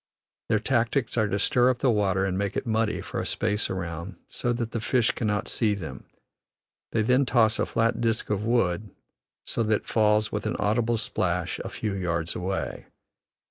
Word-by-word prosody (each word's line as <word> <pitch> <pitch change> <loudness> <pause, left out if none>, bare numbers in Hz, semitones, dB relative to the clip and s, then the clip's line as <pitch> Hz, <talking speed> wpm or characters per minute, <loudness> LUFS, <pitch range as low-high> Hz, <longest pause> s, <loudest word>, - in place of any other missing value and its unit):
Their 110 - +4
tactics 120 +2 0
are 110 -3 +2
to 100 - 0
stir 125 +4 +3
up 130 - +1
the 130 0 +2
water 95 -3 +2
and 95 -1 -1
make 100 0 -1
it - - -2
muddy 110 -1 0
for - - -5
a - - -2
space 105 -1 0
around, 85 0 -4
so 120 - -1
that 120 -1 -2
the 115 - -2
fish 120 +1 +2
cannot 105 -3 -1
see 110 -3 +1
them; 80 -9 -7 0.9
they 110 - +1
then 125 +4 +4
toss 120 -3 +3
a - - +1
flat 115 +1 +1
disk 115 -2 0
of 105 0 0
wood 105 -4 +1 0.6
so - - 0
that 110 -1 +2
it - - -29
falls 105 -1 +2
with 105 0 -2
an - - -1
audible 115 +2 +1
splash 90 -5 -1
a - - -5
few 105 -3 -3
yards 85 -3 -1
away. 95 +2 -3
110 Hz, 190 wpm, -26 LUFS, 95-115 Hz, 0.9 s, Their